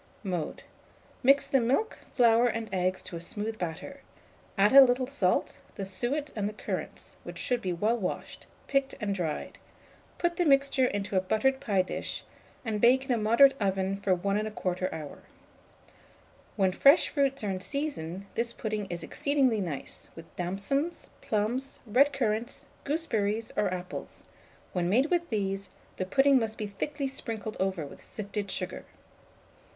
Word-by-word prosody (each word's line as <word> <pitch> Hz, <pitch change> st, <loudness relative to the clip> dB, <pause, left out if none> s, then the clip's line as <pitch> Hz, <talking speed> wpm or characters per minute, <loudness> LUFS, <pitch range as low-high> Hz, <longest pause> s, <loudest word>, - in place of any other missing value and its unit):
Mode. 180 Hz, -5 st, -3 dB, 0.6 s
Mix 275 Hz, +2 st, +5 dB
the 270 Hz, -, +2 dB
milk, 275 Hz, -, 0 dB, 0.2 s
flour, 235 Hz, -1 st, +5 dB
and 230 Hz, -1 st, -2 dB
eggs 185 Hz, 0 st, 0 dB
to -, -, -6 dB
a 165 Hz, -, -5 dB
smooth 215 Hz, +5 st, -4 dB
batter; 180 Hz, -, -5 dB, 0.6 s
add 205 Hz, +2 st, +5 dB
a 275 Hz, -, +11 dB
little 255 Hz, 0 st, +4 dB
salt, 230 Hz, -9 st, 0 dB, 0.2 s
the 195 Hz, -, -4 dB
suet, 240 Hz, +11 st, -1 dB
and 205 Hz, -1 st, -1 dB
the -, -, -8 dB
currants, -, -, -5 dB
which -, -, -8 dB
should 245 Hz, -2 st, 0 dB
be 185 Hz, -, -1 dB
well 210 Hz, +7 st, +1 dB
washed, 185 Hz, -, -5 dB, 0.2 s
picked, 275 Hz, -1 st, 0 dB
and 205 Hz, -1 st, -1 dB
dried; 170 Hz, -5 st, -3 dB, 0.6 s
put 345 Hz, 0 st, 0 dB
the 355 Hz, -, +2 dB
mixture 275 Hz, -2 st, +4 dB
into 200 Hz, -2 st, -3 dB
a 185 Hz, -, +4 dB
buttered 220 Hz, +8 st, +1 dB
pie 200 Hz, -7 st, +2 dB
dish, -, -, -4 dB, 0.4 s
and 215 Hz, -2 st, -1 dB
bake 260 Hz, +3 st, +5 dB
in 270 Hz, -, -2 dB
a 240 Hz, -, +3 dB
moderate 235 Hz, +6 st, +6 dB
oven 195 Hz, -1 st, +1 dB
for 195 Hz, -1 st, +1 dB
1 200 Hz, +3 st, 0 dB
1/4 185 Hz, -4 st, -2 dB
hour. 155 Hz, -2 st, -7 dB, 1.4 s
When 190 Hz, -3 st, +3 dB
fresh 280 Hz, -, +6 dB
fruits 275 Hz, -3 st, 0 dB
are 205 Hz, -, 0 dB
in 185 Hz, -, -3 dB
season, 200 Hz, -, -3 dB
this 235 Hz, 0 st, -1 dB
pudding 215 Hz, -2 st, -3 dB
is 170 Hz, -1 st, -4 dB
exceedingly 265 Hz, -, +1 dB
nice, 160 Hz, -7 st, -5 dB
with 165 Hz, 0 st, -13 dB
damsons, 200 Hz, -, -2 dB
plums, 235 Hz, +6 st, -1 dB
red 260 Hz, +6 st, +4 dB
currants, 240 Hz, +1 st, -1 dB, 0.2 s
gooseberries, 225 Hz, -8 st, -1 dB
or 200 Hz, -3 st, +1 dB
apples; 180 Hz, 0 st, -6 dB, 0.5 s
when 175 Hz, -1 st, 0 dB
made 260 Hz, -, +3 dB
with 345 Hz, -1 st, +1 dB
these, 195 Hz, -3 st, -2 dB, 0.3 s
the 185 Hz, -, -2 dB
pudding 270 Hz, +5 st, +5 dB
must 220 Hz, -2 st, -3 dB
be 215 Hz, -, -3 dB
thickly 280 Hz, +8 st, -3 dB
sprinkled 220 Hz, -5 st, -5 dB
over 190 Hz, -5 st, 0 dB
with 140 Hz, -, -12 dB
sifted 205 Hz, -1 st, -5 dB
sugar. 185 Hz, 0 st, -3 dB
215 Hz, 160 wpm, -29 LUFS, 190-270 Hz, 1.4 s, a